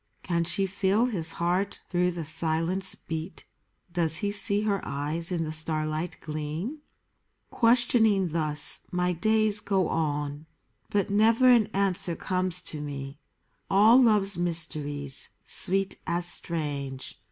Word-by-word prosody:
Can 170 -1 0
she 195 +3 +1
feel 195 +4 +1
his 175 -9 -3
heart 180 +3 -1
through 180 0 +2
the 170 -2 -5
silence 165 +4 0
beat? 160 +2 -6 0.5
Does 165 -2 +2
he 200 +5 -1
see 205 0 +2
her 205 -2 0
eyes 155 +5 -3
in 170 -2 0
the 155 0 -4
starlight 155 +1 -1
gleam? 155 - -4 0.7
Questioning 230 -5 +3
thus, 155 -2 -1
my 180 0 +1
days 215 +3 +2
go 195 -3 0
on; 145 -1 -2 0.4
But 200 -1 0
never 225 +5 +4
an 230 -4 +5
answer 190 -3 0
comes 185 -1 -1
to 150 - -6
me: 140 -1 -6 0.5
All 220 +6 +7
love's 205 -6 +3
mysteries, 150 -5 -3
sweet 195 +1 -1
as 175 0 -1
strange. 145 -6 -5
175 Hz, 130 wpm, -27 LUFS, 155-200 Hz, 0.7 s, All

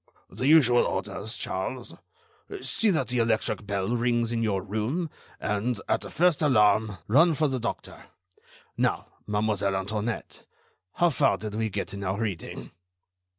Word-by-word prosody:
"The 130 - -2
usual 135 -6 +6
orders, 110 +2 -3
Charles: 120 +7 -4 0.7
see 225 - +1
that 170 -8 +1
the 125 0 +1
electric 115 -2 0
bell 100 +3 -1
rings 120 -1 +1
in 115 -1 -1
your 100 -4 0
room, 115 - -2 0.3
and, 105 +4 -1
at - - +1
the - - -6
first 175 -1 +2
alarm, 110 -6 +3
run 160 +8 +5
for 155 +1 +2
the 130 -2 -2
doctor. 115 - -5 0.7
Now, - - 0 0.2
Mademoiselle 105 -2 0
Antoinette, 105 +4 -3 0.5
how 175 -1 +3
far 115 -6 +2
did 105 +2 -6
we 110 +1 -1
get 100 - -4
in 100 0 -5
our 95 +1 -1
reading?" 105 -7 -4
110 Hz, 150 wpm, -27 LUFS, 105-130 Hz, 0.7 s, usual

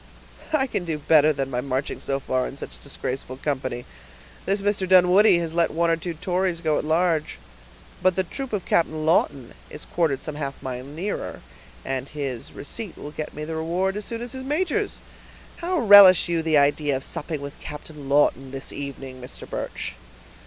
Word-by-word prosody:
"I 300 -4 +3
can 235 - -2
do 165 -3 -2
better 150 0 +5
than 135 -2 -3
by 125 -1 -1
marching 135 +1 -2
so 135 0 -1
far 130 -1 -1
in 135 - -9
such - - -8
disgraceful 130 0 -5
company; 130 -4 -3 0.6
this 195 +1 +1
Mr. 200 -2 0
Dunwoodie 185 +2 +6
has 165 -2 -2
let 170 0 +3
one 170 +1 +1
or - - +4
two 165 +1 -5
Tories 180 +1 -1
go 155 -3 +1
at - - -3
large; 160 0 +1 0.6
but 185 -1 +3
the 190 - +2
troop 270 +8 -6
of 205 -4 -2
Captain 155 -2 +1
Lawton 140 -6 +1 0.2
is 150 - -7
quartered 155 -6 0
some 155 - -4
half 140 -2 -5
mile 125 -1 -4
nearer, 165 +9 -5 0.4
and 135 0 -3
his 135 -5 -5
receipt 195 +6 -5
will 145 - -8
get 155 0 -6
me 150 - -5
the 160 +1 -4
reward 175 +4 -1
as 210 0 -3
soon 230 0 -4
as 245 - -5
his 260 0 -5
major's. 350 +8 -1 0.6
How 360 +1 -1
relish 200 - +9
you 170 -1 0
the 160 -1 +2
idea 145 0 +3
of 130 - -8
supping 150 +1 -4
with 140 0 -8
Captain 150 -1 -9
Lawton, 140 -2 +3
this 135 +1 -5
evening, 135 -2 -7
Mr. 125 - -8
Birch?" - - -4
160 Hz, 190 wpm, -24 LUFS, 140-185 Hz, 0.6 s, relish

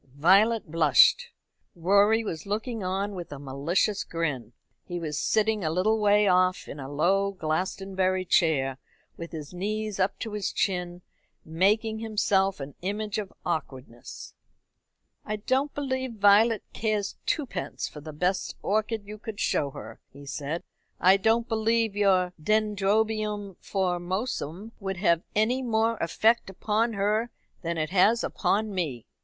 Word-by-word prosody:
Violet 200 +5 +4
blushed. 155 -5 +5 0.5
Rorie 200 +6 +3
was 165 -5 -5
looking 220 +1 -3
on 195 +3 -2
with 175 -5 -7
a 145 - -6
malicious 145 +9 0
grin. 150 -8 -3 0.3
He 175 -1 -5
was 155 -3 -4
sitting 220 -2 +1
a 155 - 0
little 200 +7 +1
way 210 0 +4
off 185 0 +2
in 145 - -8
a 135 0 -7
low 195 +7 +1
Glastonbury 185 +2 -1
chair, 135 -7 +2 0.4
with 170 0 -8
his 155 -1 -7
knees 210 +2 -3
up 190 +1 +1
to 225 - -5
his 210 -2 -2
chin, 180 -2 -2 0.4
making 210 +7 +1
himself 200 -4 +1
an 140 0 -7
image 210 +2 -2
of 200 -3 -6
awkwardness. 130 -8 -5 0.9
"I 215 - -3
don't 260 +7 0
believe 260 -3 -2
Violet 210 +2 +4
cares 215 -2 -1
twopence 295 -6 -2
for 150 - -10
the 155 +1 -8
best 180 +5 -1
orchid 215 +1 -1
you 210 +1 -9
could 220 -2 -7
show 145 - +1
her," - - -10
he 140 +1 -13
said. 145 +4 -4 0.4
"I 185 +2 +6
don't 225 +3 +2
believe 225 -1 +1
your 185 -3 +2
Dendrobium 210 0 0
Formosum 185 - -3
would 195 -2 -4
have 170 -3 +2
any 230 +5 +2
more 225 -2 +1
effect 220 +7 +2
upon 215 +4 0
her 210 +3 0 0.3
than 170 -2 -3
it 155 +1 -2
has 210 +5 +4
upon 210 +1 0
me." 150 - -3
195 Hz, 140 wpm, -27 LUFS, 170-215 Hz, 0.9 s, I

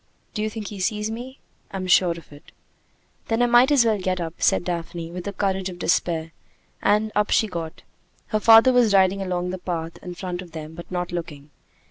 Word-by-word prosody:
"Do 210 - -3
you 215 - 0
think 215 -1 -6
he 205 - -8
sees 210 +2 -1
me?" 250 +4 -7 0.3
"I'm 190 -1 -5
sure 180 -1 +4
of 160 -3 -14
it." 145 - -16 0.8
"Then 225 +1 +1
I - - +5
might 240 +3 +5
as 270 -5 +5
well 220 -2 +2
get 185 0 -1
up," 165 -2 -4
said - - +3
Daphne, 170 -1 -4
with 180 0 -7
the 200 - -3
courage 190 -1 -1
of 180 - -9
despair, 165 -2 0 0.5
and 210 +1 +2
up 210 0 +1
she - - +3
got. 170 -4 -6 0.5
Her 215 - +1
father 225 +4 +7
was 235 -5 +4
riding 190 0 +3
along 180 -1 -2
the 185 - -5
path 165 -2 -4
in 180 -1 -7
front 180 -1 -5
of 175 -3 -13
them, 155 -1 -7
but 170 +1 -10
not 180 -1 -3
looking. 155 -4 -6
185 Hz, 210 wpm, -23 LUFS, 170-215 Hz, 0.8 s, father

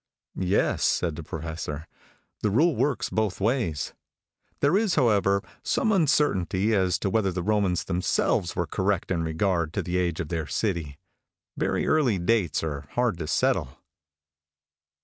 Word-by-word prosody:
"Yes," 95 +2 +1
said 85 -4 +1
the 85 - -6
Professor; 80 -1 -5 0.6
"the 105 - +1
rule 150 - +3
works 145 -4 0
both 110 -3 -1
ways. 100 - -1 0.7
There 145 +5 +3
is, 205 -2 +2
however, 100 -7 +3 0.2
some 220 - +1
uncertainty 115 - +2
as 95 -3 +2
to 100 - -1
whether 105 -3 +1
the 90 0 -3
Romans 100 -3 +1
themselves 90 -1 0
were 85 - 0
correct 95 +1 -1
in 85 -2 +1
regard 80 0 0
to - - -1
the 90 0 -2
age 85 -2 0
of 80 - -3
their 80 -3 -2
city. 85 -10 -2 0.6
Very - - 0
early 140 -10 +2
dates 90 -3 +1
are 75 -3 -4
hard 120 -8 +1
to 80 - -4
settle." - - 0
95 Hz, 150 wpm, -26 LUFS, 85-110 Hz, 0.7 s, rule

